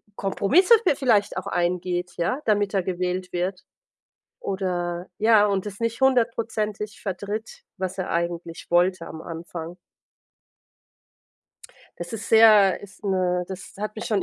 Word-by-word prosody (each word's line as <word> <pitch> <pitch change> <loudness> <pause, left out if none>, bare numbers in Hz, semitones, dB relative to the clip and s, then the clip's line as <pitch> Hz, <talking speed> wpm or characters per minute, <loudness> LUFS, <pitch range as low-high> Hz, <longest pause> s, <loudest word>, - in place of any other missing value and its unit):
Kompromisse 270 - +4
vi 350 - +5
vielleicht 220 -9 +2
auch 185 - -4
eingeht, 175 0 -1
ja, 215 - 0
damit 205 -2 +1
er 190 - +2
gewählt 180 0 -3
wird. 180 +1 -2 0.8
Oder, 180 -2 -2
ja, 215 -1 +5
und 195 -1 -1
das 200 -1 -8
nicht 230 +1 -2
100%ig 225 -5 0
vertritt, 210 - -5 0.2
was 190 0 -4
er 185 - -3
eigentlich 170 0 -3
wollte 175 0 +2
am 160 - -8
Anfang. 165 +1 -7 2.3
Es 175 +5 -7
ist 220 0 -6
sehr 215 -4 +7
ist 200 +1 -14
'ne 180 -2 +1
das 190 -1 -9
hat 210 +1 -4
mich 220 - -6
schon 205 -4 +1
190 Hz, 135 wpm, -24 LUFS, 180-215 Hz, 2.3 s, sehr